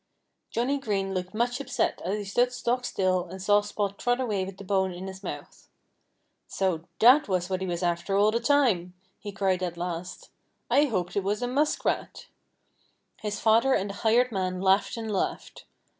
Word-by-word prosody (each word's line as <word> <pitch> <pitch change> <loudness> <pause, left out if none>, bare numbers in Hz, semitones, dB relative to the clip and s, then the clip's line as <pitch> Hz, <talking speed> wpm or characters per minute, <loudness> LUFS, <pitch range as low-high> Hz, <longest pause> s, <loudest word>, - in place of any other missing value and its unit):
Johnnie 260 +5 0
Green 195 -6 -2
looked 185 +2 -4
much 245 +3 0
upset 280 - -1
as 195 +4 -1
he 210 - -4
stood 240 +5 +1
stock 250 0 -1
still 185 -4 0
and 190 +2 -9
saw 205 +2 +4
Spot 205 -1 -3
trot 245 +1 +1
away 210 -7 -1
with 190 0 -7
the 200 - -9
bone 190 -1 +1
in 180 +1 -7
his 190 0 -8
mouth. - - -8 0.8
"So 180 -4 -1
that 255 +7 +6
was 185 -1 -1
what 185 0 -1
he 190 - -2
was 175 0 -3
after 175 +3 0
all 210 +1 +4
the 230 - 0
time!" 235 -9 +2 0.2
he 205 - -7
cried 195 -2 0
at 175 -2 -3
last. 175 0 -5 0.4
"I 290 - +5
hoped 185 -9 -2
it 200 - 0
was 205 +4 -1
a - - 0
muskrat." 290 +5 -1 1.0
His 210 -1 -3
father 230 +4 +4
and 200 +1 -1
the 200 - -10
hired 240 +3 +3
man 185 -3 -2
laughed 195 +4 +2
and 225 -1 -4
laughed. 195 - -3
200 Hz, 190 wpm, -27 LUFS, 185-235 Hz, 1.0 s, that